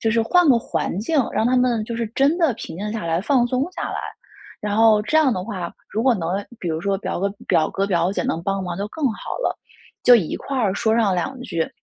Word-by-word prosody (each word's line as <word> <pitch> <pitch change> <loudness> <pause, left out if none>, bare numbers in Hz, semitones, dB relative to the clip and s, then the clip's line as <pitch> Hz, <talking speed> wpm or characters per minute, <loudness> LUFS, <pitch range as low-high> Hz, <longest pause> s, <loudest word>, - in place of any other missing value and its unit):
就 225 - +1
是 230 0 +2
换 350 +7 +4
个 245 -3 +6
环 195 - -3
境， 295 +8 0
让 220 - +1
她 255 - +2
们 240 -3 +2
就 235 - -5
是 230 -1 -1
真 275 +8 +2
的 325 -6 +3
平 - - -8
静 210 +2 -3
下 220 -6 -4
来、 165 +1 0
放 245 +2 +2
松 255 +2 0
下 - - -5
来。 - - -3 0.6
然 205 0 -2
后 220 -1 +5
这 310 +9 +2
样 275 -6 +4
的 185 -2 -3
话， 185 -6 -5 0.2
如 220 - -1
果 255 -1 +4
能 165 -6 -3 0.3
比 175 - -4
如 160 0 -2
说 195 +1 0
表 - - -3
哥 200 - +1 0.2
表 155 - +3
哥、 195 +1 -1
表 175 -1 +1
姐 - - -1
能 165 - -2
帮 195 +1 -1
忙 180 -1 -4
就 200 - -2
更 310 +5 -5
好 - - -7
了， - - -1 0.5
就 245 - +9
一 180 -9 -1
块 275 - -5
儿 205 -6 +1
说 220 0 +1
上 215 -5 +2
两 255 +9 -2
句， 170 -10 -2
220 Hz, 275 characters per minute, -22 LUFS, 190-250 Hz, 0.6 s, 就